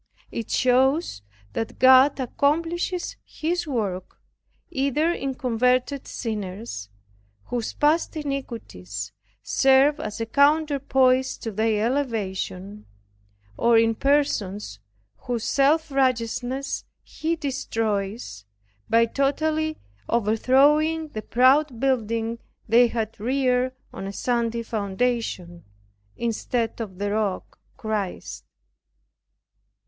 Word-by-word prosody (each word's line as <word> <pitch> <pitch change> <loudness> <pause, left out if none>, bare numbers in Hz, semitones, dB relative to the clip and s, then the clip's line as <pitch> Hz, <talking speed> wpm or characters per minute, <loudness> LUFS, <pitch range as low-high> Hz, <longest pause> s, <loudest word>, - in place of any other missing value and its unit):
It 230 - -5
shows 260 - +2 0.3
that 225 - -4
God 260 +2 +6
accomplishes 330 +7 -1
His 345 +2 -3
work 200 -9 -3 0.5
either 280 +5 +1
in 275 -6 -3
converted 250 +2 0
sinners, 200 - -5 0.5
whose 240 - -3
past 315 +2 +1
iniquities 225 - -5 0.3
serve 270 +3 +4
as 215 -5 -5
a 225 - -1
counterpoise 275 -2 +3
to 225 - -5
their 215 +1 +1
elevation, 210 -6 -3 0.7
or 235 -1 +4
in 225 0 +4
persons 210 - 0 0.4
whose 240 -3 -4
self 300 +4 +2
righteousness 260 +1 -1 0.2
He 325 +2 -2
destroys, 220 - -3 0.4
by 230 0 +5
totally 310 +5 0 0.3
overthrowing 280 +8 +3
the 215 - -5
proud 255 +2 +3
building 230 -3 0 0.3
they 235 +2 +6
had 225 -2 -4
reared 255 +2 +1 0.2
on 195 - -6
a 195 - -6
sandy 235 0 -1
foundation, 205 -4 -2 0.5
instead 230 0 -2
of 195 -5 -6
the 205 +1 -2
Rock 205 -3 -2 0.2
CHRIST. 210 -4 -4
245 Hz, 95 wpm, -24 LUFS, 220-275 Hz, 0.7 s, God